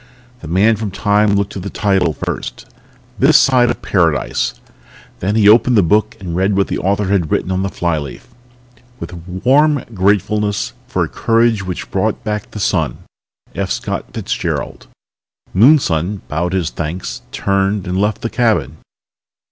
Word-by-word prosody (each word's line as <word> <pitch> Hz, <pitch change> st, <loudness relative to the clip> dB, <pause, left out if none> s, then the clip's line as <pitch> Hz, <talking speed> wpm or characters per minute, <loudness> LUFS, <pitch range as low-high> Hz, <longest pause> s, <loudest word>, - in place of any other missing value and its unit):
The 80 Hz, -, -10 dB
Man 100 Hz, +7 st, +3 dB
from 105 Hz, -1 st, -3 dB
Time 105 Hz, +1 st, +2 dB
looked 100 Hz, 0 st, -1 dB
at 95 Hz, -, -5 dB
the 100 Hz, -, -5 dB
title 95 Hz, -6 st, +1 dB
first... -, -, -5 dB, 0.5 s
THIS -, -, +6 dB
SIDE 125 Hz, -2 st, +4 dB
OF -, -, -3 dB
PARADISE. 80 Hz, -8 st, 0 dB, 0.6 s
Then 100 Hz, +4 st, -1 dB
he 105 Hz, -2 st, +4 dB
opened 115 Hz, +2 st, +5 dB
the 100 Hz, -, +5 dB
book 105 Hz, +5 st, +1 dB
and 90 Hz, -3 st, -5 dB
read 95 Hz, +2 st, +1 dB
what 100 Hz, -, +1 dB
the -, -, -2 dB
author 100 Hz, +1 st, 0 dB
had 95 Hz, -6 st, +1 dB
written 95 Hz, -, 0 dB
on 95 Hz, 0 st, 0 dB
the 95 Hz, -, -1 dB
flyleaf: 80 Hz, -7 st, -3 dB, 0.7 s
With -, -, -7 dB
warm 135 Hz, +10 st, +2 dB
gratefulness 105 Hz, +1 st, 0 dB
for -, -, 0 dB
a -, -, -2 dB
courage 115 Hz, -2 st, +1 dB
which 90 Hz, -1 st, -6 dB
brought 110 Hz, +5 st, -1 dB
back 105 Hz, -1 st, -3 dB
the 105 Hz, -, -8 dB
sun. -, -, 0 dB, 0.6 s
F. -, -, -3 dB
Scott -, -, -4 dB
Fitzgerald. -, -, -4 dB, 0.7 s
Moonson 100 Hz, -, +3 dB
bowed 85 Hz, +4 st, -2 dB
his 90 Hz, -4 st, -1 dB
thanks, 85 Hz, +3 st, -5 dB
turned 100 Hz, 0 st, 0 dB
and 90 Hz, +2 st, -1 dB
left 105 Hz, 0 st, -1 dB
the 115 Hz, -, -1 dB
cabin. 110 Hz, -, 0 dB
100 Hz, 155 wpm, -17 LUFS, 90-110 Hz, 0.7 s, THIS